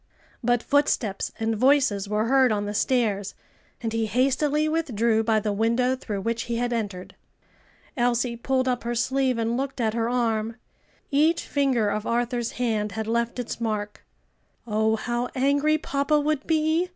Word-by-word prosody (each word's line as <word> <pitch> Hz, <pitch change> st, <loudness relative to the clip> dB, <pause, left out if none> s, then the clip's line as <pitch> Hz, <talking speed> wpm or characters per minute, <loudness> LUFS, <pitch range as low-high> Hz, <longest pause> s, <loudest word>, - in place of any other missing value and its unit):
But 240 Hz, 0 st, +2 dB
footsteps 260 Hz, -8 st, +1 dB
and 225 Hz, 0 st, 0 dB
voices 255 Hz, -5 st, +2 dB
were 210 Hz, +1 st, +1 dB
heard 260 Hz, 0 st, +4 dB
on 205 Hz, -1 st, 0 dB
the 205 Hz, -, -3 dB
stairs, 210 Hz, -4 st, 0 dB, 0.5 s
and 225 Hz, -1 st, -2 dB
he 225 Hz, -1 st, 0 dB
hastily 275 Hz, +6 st, +1 dB
withdrew 235 Hz, -8 st, +1 dB
by 220 Hz, -1 st, +2 dB
the 210 Hz, 0 st, -2 dB
window 235 Hz, +4 st, +1 dB
through 210 Hz, -6 st, -5 dB
which 230 Hz, +3 st, -2 dB
he 235 Hz, -, -2 dB
had 240 Hz, +1 st, -1 dB
entered. 200 Hz, -5 st, -4 dB, 0.8 s
Elsie 240 Hz, -1 st, +1 dB
pulled 260 Hz, +2 st, 0 dB
up 250 Hz, -1 st, 0 dB
her 240 Hz, +1 st, -2 dB
sleeve 260 Hz, +1 st, +1 dB
and 230 Hz, +1 st, 0 dB
looked 270 Hz, 0 st, -3 dB
at 220 Hz, -2 st, +1 dB
her 230 Hz, 0 st, 0 dB
arm. 225 Hz, -2 st, 0 dB, 0.6 s
Each 315 Hz, +4 st, +3 dB
finger 260 Hz, -7 st, +1 dB
of 210 Hz, +1 st, -3 dB
Arthur's 240 Hz, 0 st, -1 dB
hand 220 Hz, -4 st, -1 dB
had 220 Hz, 0 st, -3 dB
left 235 Hz, +2 st, -1 dB
its 245 Hz, -1 st, -5 dB
mark. 210 Hz, -2 st, -3 dB, 0.6 s
"Oh, 220 Hz, 0 st, +1 dB
how 240 Hz, +2 st, -2 dB
angry 285 Hz, +3 st, +2 dB
papa 290 Hz, 0 st, 0 dB
would 295 Hz, -1 st, -1 dB
be!" 320 Hz, +2 st, +1 dB
235 Hz, 165 wpm, -25 LUFS, 220-265 Hz, 0.8 s, heard